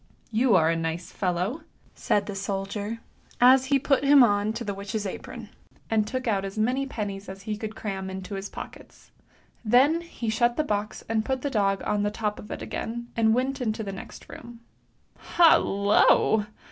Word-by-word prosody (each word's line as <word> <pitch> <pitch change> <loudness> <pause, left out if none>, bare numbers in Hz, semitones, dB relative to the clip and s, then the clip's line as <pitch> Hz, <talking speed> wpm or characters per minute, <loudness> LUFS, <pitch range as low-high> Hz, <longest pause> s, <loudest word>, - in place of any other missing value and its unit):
" - - -35
You 250 -5 +4
are 165 -2 +4
a - - 0
nice 165 +1 -4
fellow! 185 - -2 0.2
" - - -33
said 205 - +2
the 205 - -5
soldier, 200 +3 -4 0.4
as 255 +1 +6
he 275 +1 +3
put 275 0 +1
him 280 -1 +7
on 205 -2 +2
to 230 +1 -5
the 205 -3 -3
witch's 200 +2 -4
apron, 235 +3 -7 0.4
and 215 -1 +2
took 255 +1 -4
out 200 -3 +1
as 195 +1 -6
many 255 +5 0
pennies 200 -5 -5
as 190 0 -9
he 215 0 -3
could 220 +1 -6
cram 195 -3 -4
into 190 +1 -7
his 195 0 -5
pockets. - - -11 0.5
Then 265 +9 +4
he 335 -9 -7
shut 240 +2 +1
the 310 - +2
box, 210 -5 -3
and 220 -1 0
put 260 +1 -2
the 285 - -2
dog 195 -3 +1
on 210 - 0
the 205 - +1
top 210 0 -3
of 210 - -11
it - - -6
again, 235 +1 -5
and 220 -1 +3
went 265 +2 -1
into 220 -2 -2
the 195 -1 -5
next 190 - -10
room. 235 -1 -11 0.8
Hallo! 210 - +4
215 Hz, 195 wpm, -26 LUFS, 200-245 Hz, 0.8 s, him